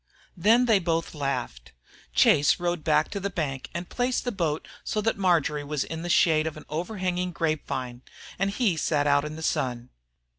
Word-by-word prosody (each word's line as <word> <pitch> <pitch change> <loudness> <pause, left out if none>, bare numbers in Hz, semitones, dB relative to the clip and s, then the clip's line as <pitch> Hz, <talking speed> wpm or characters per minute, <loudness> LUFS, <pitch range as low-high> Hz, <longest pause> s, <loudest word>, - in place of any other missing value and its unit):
Then 225 +7 +4
they 220 -4 +4
both 165 -2 -1
laughed. 130 - -4 0.4
Chase 145 +1 +4
rowed 175 -2 -1
back 150 -1 +2
to 200 - -3
the 200 +1 -2
bank 145 -7 -3
and 170 +1 -5
placed 250 0 -1
the 245 - -2
boat 165 -7 -2 0.2
so 215 - -2
that 225 +2 +1
Marjory 165 -6 +1
was 145 -1 -2
in 160 0 -6
the 175 - -4
shade 160 -2 +4
of 155 - -5
an 155 - -11
overhanging 180 +2 -2
grape 155 -2 -1
vine, 125 -2 -4 0.4
and 195 +1 +1
he 200 -4 +1
sat 150 -2 +1
out 145 0 +3
in 150 0 -6
the 160 - -7
sun. 125 -4 -2
165 Hz, 190 wpm, -26 LUFS, 145-185 Hz, 0.4 s, Then